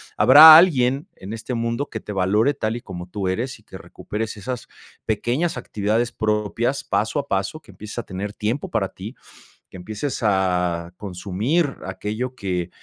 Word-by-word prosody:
habrá 155 +4 +10
alguien 140 -5 +3
en 100 +4 -8
este 115 +3 -5
mundo 115 +4 -2
que 110 - -5
te 105 - -8
valore 105 +8 +2
tal 110 -3 -2
y - - -9
como 90 -4 -8
tú 100 -1 -3
eres 115 +8 -3
y - - -24
que - - -11
recuperes 110 +1 -6
esas 120 +4 -6 0.4
pequeñas 120 - -1
actividades 110 +3 -1
propias, 110 +4 -1
paso 110 +7 0
a 140 - -5
paso, 100 +9 -2
que 150 - -17
empieces 105 +2 -10
a - - -4
tener 100 +1 -5
tiempo 115 +7 -3
para 105 -4 0
ti, 105 +7 -9 0.6
que 95 - -11
empieces 110 +9 -4
a 90 -4 0
consumir 105 - -2
aquello 110 +7 -4
que 90 -5 -3
110 Hz, 170 wpm, -22 LUFS, 95-125 Hz, 0.6 s, habrá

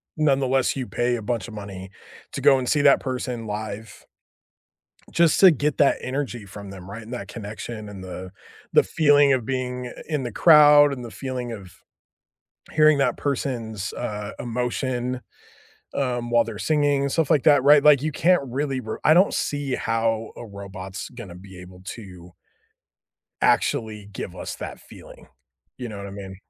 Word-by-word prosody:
nonetheless, 135 -4 +1
you 130 -2 -3
pay 120 0 0
a - - -7
bunch 110 -2 -3
of - - -11
money 95 -2 -8 0.4
to - - -5
go 135 - +6
and 125 - -4
see 150 - +2
that 140 -1 +5
person 125 -3 -4
live, 105 +1 -6 1.1
just 170 -2 +3
to 190 - +9
get 150 -1 0
that 140 - +4
energy 130 -5 -4
from 100 0 -10
them, 95 -1 -10
right, 115 +3 -7
and 110 +3 -11
that 125 - -6
connection 110 0 -7
and 95 -2 -9
the 95 0 -8 0.4
the - - +6
feeling 145 -3 +4
of 125 -3 -2
being 125 0 -3 0.2
in 150 -4 -1
the 120 -2 -5
crowd 150 0 +7
and 125 -2 -8
the 115 - -8
feeling 125 -2 -5
of 95 -5 -10 1.0
hearing 155 -1 +5
that 140 - +1
person's, 115 -8 -3
uh, 105 -1 -5
emotion, 125 +1 -2 0.7
um, 120 -3 -2
while 120 -1 +4
they're 110 -2 -7
singing, 145 0 +1
stuff 160 +2 0
like 155 -5 +3
that, 145 -3 +5
right? 145 +1 +6
Like, 150 -3 +6
you 155 +1 -1
can't 180 +3 +3
really 135 +1 -2
r 110 - -5
I 155 - +6
don't 185 +4 +4
see 145 -2 -2
how 115 0 -1
a - - -8
robot's 100 0 -8
gonna 115 -8 -10
be 95 0 -12
able 90 0 -13
to 90 -6 -12 1.1
actually 105 -2 +1
give 95 -1 -7
us - - -6
that - - -8
feeling. - - -15 0.5
You 125 -2 -6
know 105 - -8
what 100 0 -7
I - - -9
mean? 95 -1 -8
120 Hz, 170 wpm, -23 LUFS, 105-140 Hz, 1.1 s, to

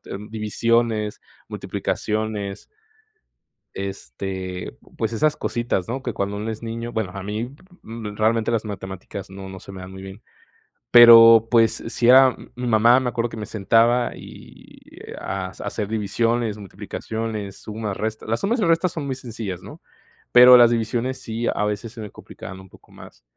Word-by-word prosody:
d - - -7
divisiones, 110 0 0 0.3
multiplicaciones, 105 -2 -3 1.1
este, 95 -3 -6 0.2
pues 110 0 -1
esas 150 +6 +2
cositas, 120 -5 -2
¿no?, 130 +3 -4
que 120 - -3
cuando 100 +1 -2
uno 105 +2 -4
es 110 +1 -7
niño 115 +1 -5
Bueno, 105 -5 -3
a 100 - -6
mí, 110 +6 -5 0.3
realmente, 110 0 -1
las 115 -1 0
matemáticas 95 -1 -7
no 95 0 -9
no 95 0 -9
se 100 - -12
me 95 - -9
dan 95 +1 -10
muy 95 0 -10
bien. 95 +2 -10 0.7
Pero, 115 -1 +9
pues 115 -2 +3
sí 120 0 -1
era, 130 +1 +8
mm, - - -14
mi 125 0 -4
mamá, 120 +3 +5
me 125 - -1
acuerdo 120 0 -1
que 115 - -9
me 105 - -5
sentaba 115 +4 +2
y - - -14 0.4
hac 95 -1 -5
hacer 105 - -4
divisiones, 110 +1 -1
multiplicaciones, 105 +1 -6
sumas, 105 -2 -5
resta 110 0 -4
las 115 +1 -1
sumas 230 +5 0
y - - +2
restas 165 +1 +2
son 155 -4 -4
muy 135 - -2
sencillas, 115 -7 -6
¿no?, - - -12 0.5
pero 125 +1 +10
las 120 -1 +6
divisiones, 120 +3 -1
sí, 115 +1 -4
a 105 - -1
veces 105 +2 -4
se 115 - -9
me 105 - -8
complicaban 95 0 -11
un 95 -1 -14
poco - - -21
más. - - -15
110 Hz, 165 wpm, -22 LUFS, 100-120 Hz, 1.1 s, pero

